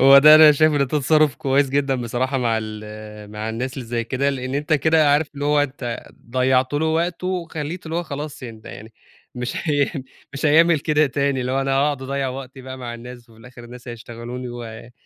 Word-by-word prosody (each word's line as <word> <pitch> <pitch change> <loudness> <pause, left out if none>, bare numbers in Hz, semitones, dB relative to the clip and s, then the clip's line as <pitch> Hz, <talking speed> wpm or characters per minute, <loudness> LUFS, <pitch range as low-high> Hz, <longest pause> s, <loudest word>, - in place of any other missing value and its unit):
هو 135 +1 +9
ده 150 +2 +9
أنا 155 -1 +9
شايفه 155 +1 +3
إن - - +2
ده 140 - +3
تصرّف 150 0 +2
كويس 135 0 +1
جدًا 140 -1 +1
بصراحة 125 +2 -2
مع 115 -2 +1
ال 105 -1 -9
مع 105 +1 -5
الناس 125 +3 -4
اللي 130 -4 -6
زي 115 0 -2
كده، 135 +3 0
لإن 130 0 -4
أنت 150 +2 -2
كده 155 0 +4
عارف 150 +1 +2
اللي 145 0 -4
هو 150 0 +3
أنت 130 -4 -5 0.2
ضيّعت 130 +1 +2
له 160 +2 +1
وقته، 170 +3 -1
وخلّيته 170 -2 -4
اللي 160 +1 -3
هو 175 - 0
خلاص 145 -2 -7
يعني 115 -3 -8
ده 115 - -11
يعني 110 +1 -11 0.4
مش 125 0 -4 0.2
هي 145 -1 +1 0.4
مش 140 +3 -1
هيعمل 160 +2 +5
كده 155 -1 +2
تاني 140 0 -1
اللي 125 +1 -2
هو 135 - +1
أنا 135 0 -1
هاقعُد 140 0 +1
اضيّع 135 0 -2
وقتي 130 0 -8
بقى 130 0 -8
مع 120 -2 -6
الناس، 125 +1 -9
وفي 110 - -19
الآخر 120 +1 -13
الناس 120 +1 -12
هيشتغلوني، 120 +2 -7
و 115 -1 -9
135 Hz, 215 wpm, -21 LUFS, 120-145 Hz, 0.4 s, هو